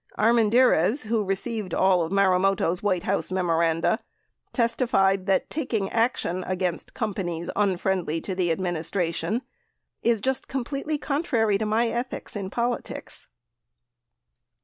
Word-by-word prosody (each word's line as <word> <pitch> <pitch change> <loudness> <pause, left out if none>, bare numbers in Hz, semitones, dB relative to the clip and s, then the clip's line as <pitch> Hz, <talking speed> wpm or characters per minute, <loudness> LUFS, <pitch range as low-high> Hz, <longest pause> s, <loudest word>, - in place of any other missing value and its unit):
Armendariz, 230 - +4
who 220 -1 +1
received 195 0 -2
all 185 -2 +4
of 165 +1 -2
Marumoto's 190 -2 +2
White 185 -4 0
House 195 -1 -1
memoranda, 170 +1 +1 0.5
testified 195 -6 +2
that 195 - +2
taking 230 -10 -2
action 225 -6 0
against 185 -2 -3
companies 180 -6 -3
unfriendly 185 -4 0
to 190 - -4
the 180 -2 0
administration 175 +4 -1 0.6
"is 230 -1 +2
just 265 +4 -1
completely 275 +4 -3
contrary 245 -9 0
to 215 - -1
my 225 +3 +2
ethics 245 0 -4
in 195 -2 -4
politics." 235 +3 -4
195 Hz, 115 wpm, -25 LUFS, 180-235 Hz, 0.6 s, Armendariz